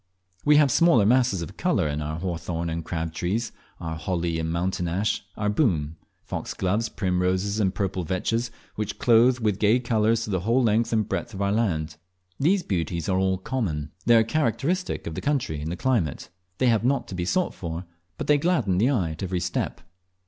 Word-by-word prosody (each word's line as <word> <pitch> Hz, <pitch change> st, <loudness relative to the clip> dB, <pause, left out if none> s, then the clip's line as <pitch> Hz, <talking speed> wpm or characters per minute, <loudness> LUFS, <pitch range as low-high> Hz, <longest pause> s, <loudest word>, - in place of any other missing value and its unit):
We, 150 Hz, 0 st, +5 dB
have 145 Hz, -3 st, +5 dB
smaller 145 Hz, -11 st, +5 dB
masses 120 Hz, -6 st, +3 dB
of 80 Hz, -, -9 dB
colour -, -, +1 dB
in 75 Hz, +1 st, -2 dB
our 75 Hz, +1 st, -3 dB
hawthorn 85 Hz, -1 st, -3 dB
and 80 Hz, 0 st, -3 dB
crab 80 Hz, -1 st, -3 dB
trees, 105 Hz, +8 st, -2 dB, 0.3 s
our 80 Hz, -1 st, -4 dB
holly 85 Hz, -1 st, -1 dB
and 80 Hz, 0 st, -2 dB
mountain 90 Hz, +1 st, -1 dB
ash, 95 Hz, +6 st, -1 dB
our 105 Hz, -, -1 dB
boom; 90 Hz, -, +1 dB, 0.3 s
foxgloves, 105 Hz, +5 st, -2 dB
primroses, 95 Hz, +1 st, 0 dB
and 95 Hz, -3 st, +2 dB
purple 95 Hz, -2 st, -1 dB
vetches, 115 Hz, +8 st, -1 dB, 0.2 s
which 105 Hz, -1 st, -4 dB
clothe 120 Hz, +2 st, +5 dB
with 105 Hz, -4 st, 0 dB
gay 110 Hz, +4 st, +4 dB
colours 115 Hz, -1 st, +1 dB
the 95 Hz, -3 st, -1 dB
whole 115 Hz, +8 st, +2 dB
length 115 Hz, +1 st, +2 dB
and 110 Hz, -2 st, +1 dB
breadth 120 Hz, -, -3 dB
of 95 Hz, -, -5 dB
our 100 Hz, -, +1 dB
land, 80 Hz, -8 st, 0 dB, 0.4 s
These 180 Hz, +6 st, +3 dB
beauties 85 Hz, -3 st, -2 dB
are 95 Hz, 0 st, +2 dB
all 95 Hz, 0 st, +1 dB
common. 90 Hz, -, -3 dB, 0.2 s
They 120 Hz, -, +7 dB
are 115 Hz, -, +6 dB
characteristic 155 Hz, +8 st, -1 dB
of 80 Hz, -, -4 dB
the -, -, -4 dB
country 130 Hz, -, -1 dB
and 80 Hz, +2 st, -3 dB
the -, -, -2 dB
climate; 110 Hz, -, 0 dB, 0.3 s
they 130 Hz, -, +1 dB
have 115 Hz, -2 st, +2 dB
not 125 Hz, -1 st, +1 dB
to -, -, -6 dB
be 90 Hz, -1 st, -2 dB
sought 180 Hz, -, 0 dB
for, 85 Hz, 0 st, -5 dB, 0.3 s
but -, -, -4 dB
they 150 Hz, -1 st, +4 dB
gladden 130 Hz, -, +1 dB
the 120 Hz, +6 st, +4 dB
eye 95 Hz, -, +1 dB
at 80 Hz, -, -8 dB
every 95 Hz, -2 st, -1 dB
step. 85 Hz, +1 st, -2 dB
100 Hz, 195 wpm, -25 LUFS, 85-120 Hz, 0.4 s, They